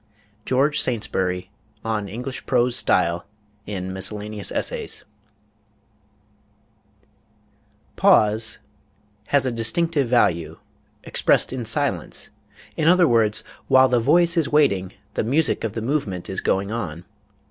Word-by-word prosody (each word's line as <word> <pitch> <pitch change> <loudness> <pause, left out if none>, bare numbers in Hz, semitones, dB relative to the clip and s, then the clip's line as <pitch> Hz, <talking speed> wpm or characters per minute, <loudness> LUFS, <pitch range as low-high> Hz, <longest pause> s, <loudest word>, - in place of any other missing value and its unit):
GEORGE 140 +3 +2
SAINTSBURY, 95 -6 -1 0.3
on 105 -3 -2
English 125 +5 -6
Prose 125 -1 +2
Style, 85 -5 +1 0.4
in 95 -2 -4
Miscellaneous 105 +2 -2
Essays.... - - -1 2.9
pause... 110 +1 +3 0.7
has 140 -2 +3
a 130 - 0
distinctive 135 +6 +1
value, 85 -9 +1 0.5
expressed - - +1
in 125 -3 -4
silence; 115 - -2 0.4
in 155 - 0
other 180 0 +5
words, 110 -4 +2 0.2
while 130 0 +6
the 125 -1 +2
voice 170 +8 +3
is 160 -4 +2
waiting, 100 -12 +2 0.2
the - - -1
music 140 +6 0
of 110 -3 -2
the 115 - -4
movement 110 - -2
is 95 - -3
going 100 +2 0
on 90 -7 -5
115 Hz, 115 wpm, -22 LUFS, 95-135 Hz, 2.9 s, while